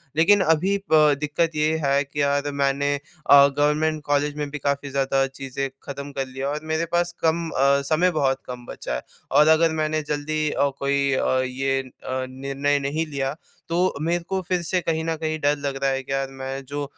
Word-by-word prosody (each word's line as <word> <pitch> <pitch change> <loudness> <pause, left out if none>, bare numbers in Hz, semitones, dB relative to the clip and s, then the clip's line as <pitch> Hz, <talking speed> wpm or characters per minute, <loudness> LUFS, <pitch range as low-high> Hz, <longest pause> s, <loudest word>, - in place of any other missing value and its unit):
लेकिन 195 +5 +5
अभी 195 +5 0
प 150 -2 +6
दिक्कत 155 +2 0
ये 155 +1 +2
है 140 +1 +3
कि 145 +1 -4
यार! 140 0 +1
मैंने 140 0 +1
अ, 145 -1 +4
गवर्नमेंट 150 +2 +1
कॉलेज 145 0 0
में 145 -1 -3
भी 150 - -4
क़ाफी 140 +1 -1
ज़्यादा 135 0 +1 0.2
चीज़ें 135 +1 -3
ख़त्म 140 0 -7
कर 135 -1 -3
लिया 135 +1 -4
और 150 +1 -2
मेरे 160 +1 +1
पास 175 0 +1
कम 165 0 +1
अ, 140 +1 +3
समय 175 +3 +3
बहुत 135 -4 0
कम 125 -1 -8
बचा 60 - -5
है। - - -3 0.3
और 150 +1 +5
अगर 160 +1 +5
मैंने 155 0 0
जल्दी 150 +1 -1
अ, 140 - +1
कोई 140 0 +1
अ, - - +1
ये 135 +1 -1
अ, 130 0 -5
निर्णय 140 +2 -1
नहीं 150 +4 -1
लिया 140 -1 -2 0.3
तो 180 +2 +1
मेरे 170 +1 0
को 190 +1 -2
फ़िर 180 -1 0
से 180 +2 0
कहीं 160 -1 -1
न 165 0 0
कहीं 155 0 -2
डर 145 0 +2
लग 140 -1 -3
रहा 135 - +3
है 135 0 -2
कि 135 - -9
यार 135 0 0
मैं 135 0 -5
जो 145 +2 -4
145 Hz, 205 wpm, -23 LUFS, 135-155 Hz, 0.3 s, प